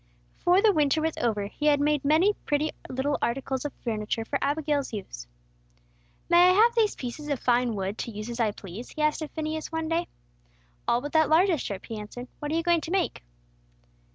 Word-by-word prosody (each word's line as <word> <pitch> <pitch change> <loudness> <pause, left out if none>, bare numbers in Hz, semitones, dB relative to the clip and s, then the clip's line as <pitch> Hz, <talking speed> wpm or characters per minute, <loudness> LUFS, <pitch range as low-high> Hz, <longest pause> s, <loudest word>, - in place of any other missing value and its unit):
Before 360 +3 +4
the 430 -2 +6
winter 300 -1 +2
was 320 0 -1
over, 215 -4 0
he 295 +9 -3
had 290 -1 +4
made 295 -1 +1
many 320 +8 +4
pretty 300 -4 -1 0.2
little 265 +3 -1
articles 265 +2 -2
of 290 - -3
furniture 225 -1 -2
for 280 +3 -2
Abigail's 290 -1 0
use. - - -7 1.0
"May 350 +1 +6
I - - +5
have 450 +5 +5
these 450 -3 +2
pieces 260 +4 -6
of 285 -3 -1
fine 245 -2 +2
wood 195 +2 -3
to - - -3
use 210 +1 -6
as 240 0 -6
I 225 -2 +3
please?" 205 +3 -8
he 305 - -3
asked 305 +1 +1
of 310 - -4
Phineas, 315 0 -4
one 320 -1 -2
day. 335 +1 0 0.8
"All 240 +1 +2
but 290 +2 -5
that 315 -1 +3
largest 330 0 +3
strip," 200 -1 -5
he 225 -2 -6
answered. 245 +4 -8
"What 295 -1 -4
are - - 0
you 330 - +1
going 345 -1 +3
to 320 - -6
make?" 375 0 0
290 Hz, 210 wpm, -27 LUFS, 235-320 Hz, 1.0 s, the